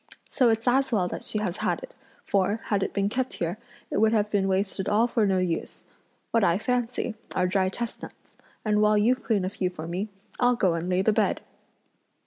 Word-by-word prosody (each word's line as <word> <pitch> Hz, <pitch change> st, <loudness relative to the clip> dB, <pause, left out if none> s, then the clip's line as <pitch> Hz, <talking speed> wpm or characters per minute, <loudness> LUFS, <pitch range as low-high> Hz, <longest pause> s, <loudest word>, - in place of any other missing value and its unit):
So 250 Hz, -4 st, +3 dB
it's 225 Hz, +2 st, 0 dB
as 265 Hz, +2 st, +3 dB
well 195 Hz, -6 st, +2 dB
that -, -, -6 dB
she -, -, -3 dB
has 205 Hz, -3 st, -2 dB
had -, -, -1 dB
it, -, -, -10 dB, 0.3 s
for, 200 Hz, +3 st, +1 dB
had 205 Hz, -2 st, 0 dB
it -, -, -1 dB
been 200 Hz, 0 st, 0 dB
kept 255 Hz, +4 st, -2 dB
here, 175 Hz, +4 st, -3 dB, 0.3 s
it -, -, +1 dB
would 220 Hz, 0 st, +4 dB
have 210 Hz, -1 st, +1 dB
been 195 Hz, -2 st, +2 dB
wasted 190 Hz, 0 st, -1 dB
all 215 Hz, +3 st, +4 dB
for 230 Hz, -3 st, +1 dB
no 190 Hz, -1 st, +2 dB
use! 180 Hz, -3 st, -2 dB, 0.5 s
What 230 Hz, -2 st, +3 dB
I 170 Hz, -1 st, +4 dB
fancy 245 Hz, +1 st, -1 dB, 0.2 s
are 180 Hz, -, +2 dB
dry 185 Hz, 0 st, +1 dB
chestnuts; 235 Hz, +4 st, -7 dB, 0.3 s
and 210 Hz, -1 st, +2 dB
while 210 Hz, 0 st, +4 dB
you 220 Hz, +4 st, +4 dB
clean 220 Hz, -6 st, -1 dB
a -, -, -1 dB
few 185 Hz, -2 st, -2 dB
for 165 Hz, -3 st, -8 dB
me, 185 Hz, +5 st, -3 dB, 0.3 s
I'll 245 Hz, 0 st, +4 dB
go 185 Hz, -6 st, +2 dB
and 165 Hz, +2 st, -3 dB
lay 185 Hz, +1 st, +2 dB
the 220 Hz, -, +3 dB
bed!" 215 Hz, 0 st, +1 dB
205 Hz, 215 wpm, -26 LUFS, 185-225 Hz, 0.5 s, would